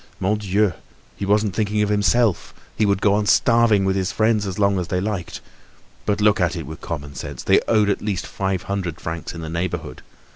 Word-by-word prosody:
Mon 100 +3 +1
Dieu! 100 -1 +1 0.4
he 100 - -4
wasn't 105 -1 +2
thinking 105 -1 +1
of 105 - -1
himself; 105 0 +1 0.2
he 105 - +2
would 100 -1 +1
go 100 - +4
on 105 0 +1
starving 115 -4 +4
with 95 0 +1
his 95 -2 -1
friends 110 -2 +1
as 95 - -4
long 100 -2 +2
as 90 - -3
they 90 0 -1
liked. 95 -3 -4 0.7
But 105 0 +1
look 105 -2 +3
at 90 - +1
it - - -5
with 80 +3 -9
common 70 -3 -6
sense. 65 - -7
They - - +4
owed 105 -2 +3
at 100 - 0
least 100 -3 -2
five 95 -2 -2
hundred 95 -5 -3
francs 80 +1 -5
in 85 - -6
the 80 - -6
neighborhood. 85 -6 -4
100 Hz, 215 wpm, -22 LUFS, 90-105 Hz, 0.7 s, go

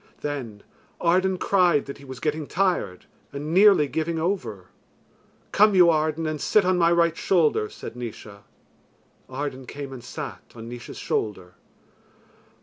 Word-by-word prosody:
Then 125 -8 -5 0.4
Arden 185 +2 +2
cried 180 -7 +2
that 140 +1 -8
he 140 - -13
was 130 -1 -9
getting 150 0 -2
tired, 175 - -1 0.3
and 145 +3 -5
nearly 195 -5 +6
giving 160 +3 -2
over. 120 - -3 0.8
"Come 210 0 +5
you, 175 -2 +7
Arden, 155 +1 0
and 155 -1 -3
sit 210 -3 +3
on 185 -1 +2
my 170 0 +4
right 170 -1 +3
shoulder," 155 - +2
said - - -9
Naois. 110 -4 -8 0.9
Arden 130 -1 -5
came 140 -1 -7
and 125 -3 -9
sat, - - -7
on 115 0 -9
Naois's 120 0 -9
shoulder. 90 -4 -3
150 Hz, 145 wpm, -24 LUFS, 125-175 Hz, 0.9 s, you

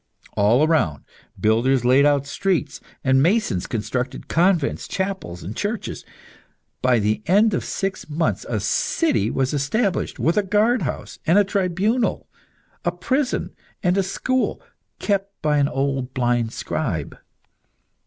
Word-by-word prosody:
All 115 +8 +4
around, 90 - +1 0.4
builders 120 +4 +2
laid 135 +3 +5
out 140 -1 +2
streets, 160 -1 -1 0.2
and 130 0 +4
masons 170 - +1
constructed 125 +3 -3
convents, 175 -3 +1
chapels, 190 - -4
and 95 +6 -6
churches. 210 +1 -3 0.8
By 130 -1 +3
the 105 0 0
end 210 +4 +4
of - - -1
six 195 -4 -3
months 160 +2 0
a - - 0
city 330 -2 +1
was 135 +1 0
established 180 - 0
with 165 +5 +1
a - - +5
guardhouse, 210 - 0
a 195 +6 +5
tribunal, 200 +4 0 0.6
a 175 - +1
prison, 255 +10 -1 0.3
and 180 -1 +3
a 195 - +3
school, 255 +7 -1 0.4
kept 200 -1 -2
by 150 -1 +2
an 140 - +3
old 135 -2 -2
blind 120 -2 +1
scribe. - - -3
160 Hz, 130 wpm, -22 LUFS, 130-195 Hz, 0.8 s, laid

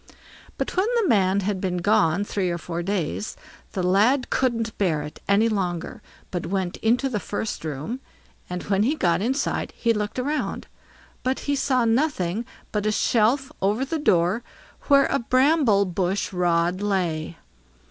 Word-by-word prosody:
But - - -3
when 375 +3 +2
the 455 -5 +2
man 195 -2 +3
had 195 -1 -2
been 180 -2 -1
gone 175 -1 +2
three 195 -3 -1
or 170 - -1
four 170 0 -4
days, 195 +2 -2 0.4
the 185 - -2
lad 215 +9 +3
couldn't 230 -3 0
bear 160 -7 +1
it 150 - -9
any 205 +3 +4
longer, 195 +2 -2 0.3
but 175 -2 -3
went 190 -1 -2
into 245 +4 +2
the 230 -6 -2
first 205 -1 -4
room, 155 - -4 0.5
and 180 0 -4
when 200 -1 +1
he 265 +9 +2
got 175 - +1
inside 260 +6 -1
he 230 -1 +2
looked 210 +1 -3
round, 290 +4 -2 0.6
but 260 +1 -1
he 285 - 0
saw 260 -3 +1
nothing 225 - 0 0.3
but 210 0 -1
a - - +3
shelf 235 +5 +2
over 210 +7 +1
the 320 +3 -2
door 180 - +2 0.5
where 280 -1 +6
a - - 0
bramble 255 -4 +3
bush 185 +2 -1
rod 175 +1 +1
lay. 175 -5 -1
205 Hz, 160 wpm, -24 LUFS, 180-250 Hz, 0.6 s, where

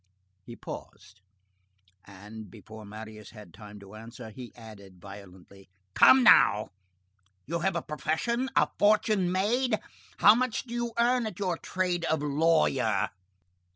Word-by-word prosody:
He 120 - -11
paused, 95 - -11 0.8
and, 105 +2 -12
before 110 +3 -13
Marius 110 0 -10
had 105 -6 -14
time 105 +1 -12
to 100 +1 -14
answer, 115 +1 -11
he 125 +1 -10
added 100 -5 -14
violently:— 95 0 -14 0.2
"Come 260 - +6
now, 105 - +5 0.8
you 170 +3 -3
have 190 0 -1
a 170 - -2
profession? 235 +12 -2
A - - +4
fortune 205 -3 +2
made? 220 +5 0 0.4
How 210 - +7
much 245 0 -1
do 240 - -10
you 240 -1 -3
earn 240 0 +2
at 210 - -8
your 185 -4 -1
trade 175 0 -3
of 160 -2 -1
lawyer?" 145 -9 +1
145 Hz, 135 wpm, -28 LUFS, -, 0.8 s, How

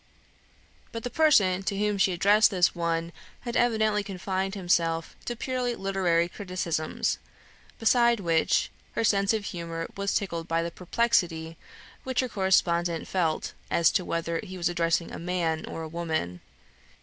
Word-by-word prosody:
But 230 - -6
the 245 - -4
person 200 -13 +4
to 195 0 -2
whom 210 0 0
she 190 - +4
addressed 205 +4 +5
this 180 -3 +2
one 170 0 -1 0.3
had 240 -1 -5
evidently 220 -3 +2
confined 190 0 -3
himself 165 -3 0
to 240 - -3
purely 250 0 -2
literary 185 -4 +1
criticisms, 180 -4 -2 0.6
besides 235 0 +4
which, 165 -4 +1 0.2
her 230 - -1
sense 200 -1 +3
of 220 -2 -1
humour 165 -2 -4
was 200 0 -1
tickled 170 -4 -2
by 165 0 0
the 170 - -4
perplexity 170 -5 0 0.5
which 260 -1 0
her 255 - -3
correspondent 175 -4 +1
felt 165 -4 -1 0.2
as 170 - +4
to 185 - +1
whether 165 -1 -2
he 185 0 -8
was 175 -1 0
addressing 170 -1 0
a - - -6
man 170 -2 -1
or 165 - -5
a - - -5
woman. 160 - -3
185 Hz, 150 wpm, -27 LUFS, 170-210 Hz, 0.6 s, addressed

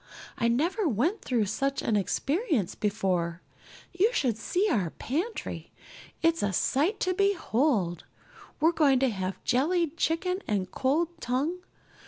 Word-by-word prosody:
I 235 - +1
never 335 - +1
went 305 - 0
through 235 -5 0
such 275 +7 -1
an 220 - +1
experience 275 - 0
before. 180 -5 -1 0.5
You 390 +6 +3
should 250 - +1
just 225 - -10
see 385 +4 +2
our 200 - +1
pantry. 340 - -4 0.5
It's 330 0 +3
a 200 -1 0
sight 320 - +1
to 370 - +1
behold. 285 - +1 0.5
We're 320 +2 +4
going 295 -5 +4
to 265 - +3
have 190 -2 -4
jellied 325 +5 +1
chicken 360 +3 0
and 195 -3 -1
cold 305 +6 +1
tongue. 290 +7 -1
275 Hz, 140 wpm, -28 LUFS, 215-345 Hz, 0.5 s, We're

